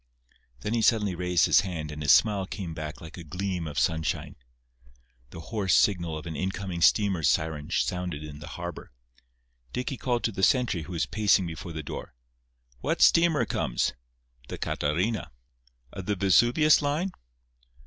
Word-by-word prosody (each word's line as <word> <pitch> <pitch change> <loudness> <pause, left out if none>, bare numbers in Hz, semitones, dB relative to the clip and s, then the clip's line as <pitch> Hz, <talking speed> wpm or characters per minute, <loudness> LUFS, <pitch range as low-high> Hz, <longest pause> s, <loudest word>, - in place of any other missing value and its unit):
Then 105 - -2
he 115 - +1
suddenly 105 -4 +3
raised 90 0 +2
his - - +5
hand 85 -6 -5
and 75 +1 -7
his 75 - +4
smile 100 -4 +4
came 90 -5 -6
back 75 -1 -7
like 80 0 -10
a 85 - -8
gleam 90 +1 -3
of 75 - -7
sunshine. 80 -4 -1 0.9
The 80 - -10
hoarse 105 -4 +2
signal 85 -5 +2
of 80 - -9
an 80 -2 -5
incoming 95 +1 -3
steamer's 95 -5 +3
siren 80 -1 -1
sounded 90 -3 -2
in 75 -1 -9
the 75 - -9
harbour. 85 -2 -7 0.8
Dicky 125 +2 -3
called 120 -1 -1
to 115 - +1
the 95 - -5
sentry 105 -3 +2
who 90 - -8
was 85 - 0
pacing 105 -3 +2
before 85 +1 -7
the 80 0 -5
door: 70 - -7 0.6
"What - - +1
steamer 165 -2 +5
comes?" - - -1 0.5
"The - - -6
Catarina." 90 +6 -1 0.6
"Of 95 - -7
the 105 - +1
Vesuvius 120 - +4
line?" 150 +6 -1
90 Hz, 160 wpm, -27 LUFS, 80-105 Hz, 0.9 s, his